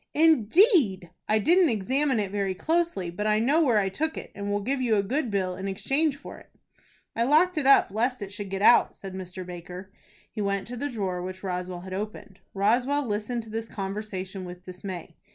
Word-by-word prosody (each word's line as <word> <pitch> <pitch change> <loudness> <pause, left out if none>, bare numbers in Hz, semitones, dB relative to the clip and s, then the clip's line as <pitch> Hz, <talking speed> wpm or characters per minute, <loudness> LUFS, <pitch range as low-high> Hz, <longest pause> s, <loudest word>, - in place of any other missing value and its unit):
"Indeed! 300 - +4 0.2
I 215 - +4
didn't 340 - +4
examine 260 +4 +1
it 200 -2 -2
very 200 -2 -1
closely. 320 - 0
But 210 +5 -3
I 215 0 +3
know 275 +9 +3
where 240 -7 +3
I 200 -2 +2
took 315 +11 -2
it, - - -7
and 200 0 -5
will 205 0 -1
give 265 +4 -1
you 235 -3 +2
a 200 - +2
good 255 +5 -1
bill 190 -3 -1
in 190 +2 -5
exchange 270 +10 0
for - - -10
it." - - -19 0.7
"I 230 - -1
locked 310 +9 +4
it 295 -4 0
up 275 - +6
lest 245 +5 0
it 200 -1 -6
should 205 -1 -6
get 195 +1 -3
out," 240 - +6
said 195 -1 -8
Mr. 185 0 -7
Baker. 180 +2 -9 0.4
He 215 - -4
went 200 -1 -1
to 245 - -5
the 285 +4 -3
drawer 190 -7 -3
which 185 +1 -7
Roswell 180 -1 -4
had 185 +1 -8
opened. 200 -1 -6 0.2
Roswell 245 +8 +2
listened 225 +2 -2
to 220 - -12
this 225 0 -4
conversation 195 -1 -5
with 180 0 -9
dismay. 180 -2 -8
210 Hz, 205 wpm, -26 LUFS, 190-260 Hz, 0.7 s, up